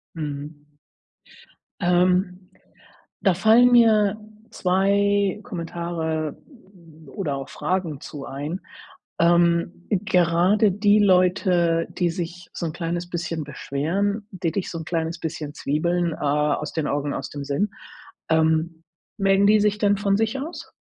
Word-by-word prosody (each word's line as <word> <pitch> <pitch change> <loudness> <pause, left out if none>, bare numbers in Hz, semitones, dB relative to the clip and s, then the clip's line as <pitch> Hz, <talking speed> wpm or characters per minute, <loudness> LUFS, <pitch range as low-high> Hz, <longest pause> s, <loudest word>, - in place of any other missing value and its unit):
Mhm. 145 -1 -6 1.2
Ähm, 180 +1 +1 0.7
da 190 - +3
fallen 225 +7 +5
mir 215 -4 +5 0.3
2 200 +2 +1
Kommentare 165 - -4 0.7
oder 160 -9 -4
auch 135 0 -6
Fragen 175 -6 -2
zu 145 -2 -8
ein. 145 +7 -5 0.6
Ähm, 170 0 +2
gerade 185 +1 +3
die 205 +2 +3
Leute, 180 -3 +3
die 175 -2 0
sich 170 +1 -6
so - - -4
'n 160 - -3
kleines 175 0 -4
bisschen 170 -2 -3
beschweren, 190 +9 -2
die 175 -4 -2
dich 195 +1 -3
so 165 - -5
'n 160 - -7
kleines 165 0 -2
bisschen 155 -3 -5
zwiebeln, 170 +5 -1
äh: - - -6
„Aus 150 +1 0
den 160 -2 -1
Augen 145 0 -1
aus - - -5
dem 145 -1 -6
Sinn.“ 145 +9 -1 0.6
Ähm, 160 +1 +1 0.3
melden 195 -1 +3
die 215 +1 +5
sich 210 0 +2
denn 205 -1 +2
von 200 0 +1
sich 225 +4 -1
aus? 320 +6 -8
175 Hz, 130 wpm, -23 LUFS, 160-200 Hz, 1.2 s, fallen